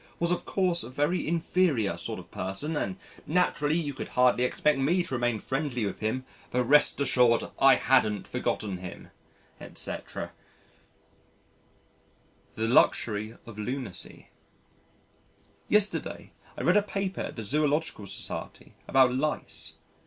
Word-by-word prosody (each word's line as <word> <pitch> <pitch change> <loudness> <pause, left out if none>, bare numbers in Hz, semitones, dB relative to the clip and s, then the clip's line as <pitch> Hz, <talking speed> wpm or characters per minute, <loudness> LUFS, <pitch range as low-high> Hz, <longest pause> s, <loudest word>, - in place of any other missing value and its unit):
was 170 0 +1
of 180 - -1
course 180 -3 +2
a - - -4
very 145 +7 0
inferior 160 - +1
sort 85 - -5
of - - -11
person 95 - -4
and 185 +5 -2 0.3
naturally, 155 -2 +2
you 150 -4 -2
could 135 - -6
hardly 125 -1 +3
expect 140 +3 +2
me 170 +7 +2
to 135 - -6
remain 120 -2 +1
friendly 135 -2 -2
with 100 - -4
him 130 +4 -2 0.2
but 125 0 +1
rest 145 +4 +4
assured 125 -4 +4 0.2
I 135 -1 +7
hadn't 110 -7 +2
forgotten 100 -4 -2
him," 90 -1 -9 0.5
etc. - - -5 2.2
The 110 +1 -1
Luxury 110 -2 +2
of 110 -3 -10
Lunacy 125 -3 -5 1.4
Yesterday, 210 -1 +1 0.2
I - - -4
read 180 - +5
a - - +5
paper 195 -1 -3
at - - -5
the 115 - -5
Zoological 150 -2 0
Society 100 - -4
about 130 -2 +5
lice. 150 +4 -2
135 Hz, 130 wpm, -28 LUFS, 115-160 Hz, 2.2 s, I